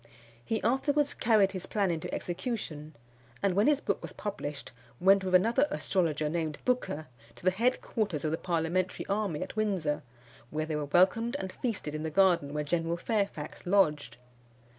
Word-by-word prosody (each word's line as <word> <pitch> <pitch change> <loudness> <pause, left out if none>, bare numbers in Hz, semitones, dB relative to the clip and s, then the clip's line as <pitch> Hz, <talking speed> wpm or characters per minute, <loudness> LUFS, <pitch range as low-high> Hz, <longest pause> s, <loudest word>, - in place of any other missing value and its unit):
He 220 - -2
afterwards 285 +4 +2
carried 215 -4 +3
his 185 -2 -5
plan 200 -4 +1
into 160 -2 -4
execution, 175 -6 -4 0.5
and 195 -2 +3
when 205 +7 +3
his 295 -2 +4
book - - -1
was - - -7
published, 150 -9 -5 0.3
went 195 +2 +5
with 185 -1 +2
another 235 +9 +4
astrologer 155 -5 0
named 155 -1 -2
Booker 245 -12 0 0.3
to - - -14
the 185 - +5
headquarters 215 - 0
of 155 - 0
the 160 - 0
parliamentary 175 +1 -1
army 200 -6 -1
at - - -9
Windsor, 190 -9 0 0.5
where 155 0 -2
they 155 -1 -3
were 150 -1 -1
welcomed 195 - +3
and 190 -8 -5
feasted 205 - -3
in 155 - -3
the 160 - -2
garden 175 -4 +3
where 150 0 -2
General 165 +2 -1
Fairfax 195 -6 -2
lodged. 150 - +2
185 Hz, 165 wpm, -30 LUFS, 155-215 Hz, 0.5 s, went